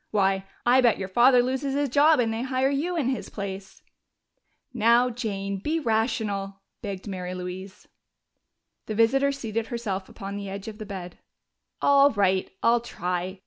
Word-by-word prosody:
Why, 195 Hz, -2 st, +1 dB, 0.2 s
I 250 Hz, +2 st, +5 dB
bet 240 Hz, -3 st, +4 dB
your 190 Hz, -, -4 dB
father 245 Hz, +5 st, +5 dB
loses 265 Hz, +2 st, -2 dB
his 285 Hz, 0 st, +1 dB
job 290 Hz, +3 st, +4 dB
and 225 Hz, -2 st, +1 dB
they 225 Hz, -, -3 dB
hire 260 Hz, +1 st, 0 dB
you 335 Hz, +6 st, -1 dB
in 270 Hz, -6 st, +1 dB
his 260 Hz, -, -3 dB
place!" 195 Hz, -1 st, -7 dB, 0.9 s
"Now, 235 Hz, +2 st, +4 dB
Jane, 200 Hz, -4 st, -3 dB
be 310 Hz, +11 st, -1 dB
rational!" 220 Hz, -5 st, -1 dB, 0.2 s
begged 195 Hz, -1 st, -6 dB
Mary 185 Hz, -2 st, -5 dB
Louise. 185 Hz, +2 st, -8 dB, 1.0 s
The 215 Hz, -, -3 dB
visitor 270 Hz, +6 st, +3 dB
seated 230 Hz, -5 st, -3 dB
herself 205 Hz, -6 st, -4 dB
upon 200 Hz, 0 st, -7 dB
the 200 Hz, -1 st, -6 dB
edge 200 Hz, +2 st, -7 dB
of 215 Hz, 0 st, -8 dB
the 215 Hz, -, -7 dB
bed. 180 Hz, -3 st, -7 dB, 0.6 s
"All 280 Hz, 0 st, +6 dB
right, 190 Hz, -5 st, +1 dB
I'll 235 Hz, +1 st, +4 dB
try.... 180 Hz, -4 st, -4 dB
220 Hz, 160 wpm, -26 LUFS, 195-255 Hz, 1.0 s, All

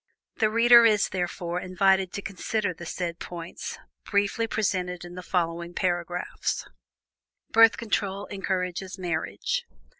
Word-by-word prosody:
The 215 Hz, -3 st, +3 dB
reader 235 Hz, +2 st, +7 dB
is, 215 Hz, -3 st, +4 dB
therefore, 175 Hz, -1 st, -2 dB
invited 190 Hz, 0 st, +2 dB
to 200 Hz, -, -4 dB
consider 200 Hz, 0 st, -2 dB
the 170 Hz, 0 st, -9 dB
said 170 Hz, -1 st, -3 dB
points, 170 Hz, -1 st, -6 dB, 0.3 s
briefly 205 Hz, +2 st, +1 dB
presented 180 Hz, -5 st, -1 dB
in 175 Hz, -, -10 dB
the 180 Hz, -, -7 dB
following 170 Hz, -1 st, -2 dB
paragraphs: 175 Hz, -1 st, -2 dB, 0.8 s
BIRTH 225 Hz, 0 st, +7 dB
CONTROL 200 Hz, -3 st, -1 dB
ENCOURAGES 190 Hz, -1 st, -2 dB
MARRIAGE. 160 Hz, -, -2 dB
185 Hz, 120 wpm, -26 LUFS, 175-205 Hz, 0.8 s, reader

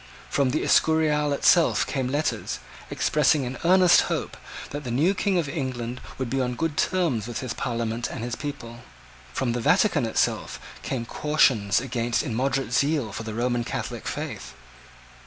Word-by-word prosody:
From 140 Hz, -2 st, +2 dB
the 155 Hz, -, 0 dB
Escurial 150 Hz, -2 st, +3 dB
itself 165 Hz, +4 st, +4 dB
came 135 Hz, -3 st, -2 dB
letters, 145 Hz, +4 st, -1 dB, 0.3 s
expressing 150 Hz, -2 st, +2 dB
an 125 Hz, +1 st, -5 dB
earnest 180 Hz, 0 st, +6 dB
hope -, -, -3 dB, 0.4 s
that 145 Hz, +1 st, -5 dB
the 125 Hz, -, -5 dB
new 150 Hz, +11 st, +2 dB
King 195 Hz, -1 st, 0 dB
of 165 Hz, -4 st, 0 dB
England 130 Hz, -5 st, -4 dB, 0.2 s
would 130 Hz, -, -2 dB
be 135 Hz, +3 st, -1 dB
on 125 Hz, -1 st, -1 dB
good 160 Hz, +3 st, -2 dB
terms 155 Hz, -, 0 dB
with 120 Hz, -, -4 dB
his 130 Hz, -3 st, -4 dB
Parliament 115 Hz, -2 st, -2 dB
and -, -, -6 dB
his 120 Hz, -2 st, -3 dB
people. 120 Hz, -5 st, -7 dB, 0.5 s
From 130 Hz, -3 st, -1 dB
the 120 Hz, 0 st, -2 dB
Vatican 175 Hz, -, +3 dB
itself 110 Hz, -, -1 dB, 0.2 s
came 120 Hz, -3 st, -3 dB
cautions 120 Hz, -8 st, +2 dB
against 120 Hz, -2 st, -1 dB
immoderate 130 Hz, -1 st, -1 dB
zeal 140 Hz, -5 st, +1 dB
for 110 Hz, -, -5 dB
the 110 Hz, -1 st, -6 dB
Roman 120 Hz, 0 st, 0 dB
Catholic -, -, -5 dB
faith. -, -, -5 dB
130 Hz, 160 wpm, -25 LUFS, 120-150 Hz, 0.5 s, earnest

